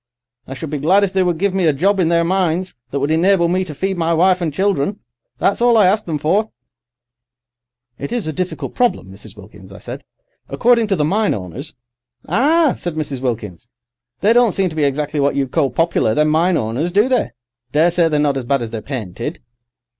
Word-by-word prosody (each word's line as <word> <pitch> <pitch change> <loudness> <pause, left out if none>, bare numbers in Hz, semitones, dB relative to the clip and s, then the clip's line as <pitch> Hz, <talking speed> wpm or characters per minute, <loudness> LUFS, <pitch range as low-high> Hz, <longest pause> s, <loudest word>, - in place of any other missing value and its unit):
I 135 - -7
should 150 +2 -7
be 150 - -2
glad 185 +8 +3
if 195 -1 -1
they 190 - +2
would 175 -2 0
give 195 +2 0
me 190 -3 +1
a 155 - +3
job 195 +8 +1
in 170 -3 +2
their 170 0 +2
mines 185 0 0 0.2
that 140 - -2
would 140 +3 -1
enable 170 +2 +3
me 185 +2 0
to 155 -4 -8
feed 190 +4 -2
my 165 0 +1
wife 185 +2 +3
and 165 -3 -1
children. 195 +2 -1 0.4
That's 200 - 0
all 240 -1 +4
I 210 - +5
ask 205 +4 +2
them 160 -3 -2
for!'" 190 +9 0 1.5
"It 140 - -5
is 240 -3 -2
a 155 - -3
difficult 185 +3 -4
problem, 240 - 0
Mrs. 100 +2 -13
Wilkins," 95 -1 -14
I 95 - -11
said. - - -8 0.5
"According 235 -2 +2
to 200 - +1
the 150 -4 0
mine 205 +6 +1
owners—" 105 - -8 0.5
"Ah," 305 +4 +3
said 175 -3 -4
Mrs. 145 -4 -4
Wilkins. 115 -3 -4 0.5
"They 210 +3 +4
don't 240 -4 +4
seem 190 -3 0
to - - -9
be 155 -2 +1
exactly 145 +2 -1
what 140 0 +1
you'd 135 -2 -1
call 150 -5 +1
popular, 165 -10 0
them 150 0 +2
mine 165 +3 +2
owners, 120 +11 -2
do 205 +6 +3
they? 250 - 0 0.4
Daresay 165 +3 +3
they're 150 -1 0
not 145 -2 +1
as 130 - -4
bad 135 0 0
as 110 - -6
they're 110 -2 -5
painted." 120 - -6
165 Hz, 215 wpm, -18 LUFS, 140-195 Hz, 1.5 s, I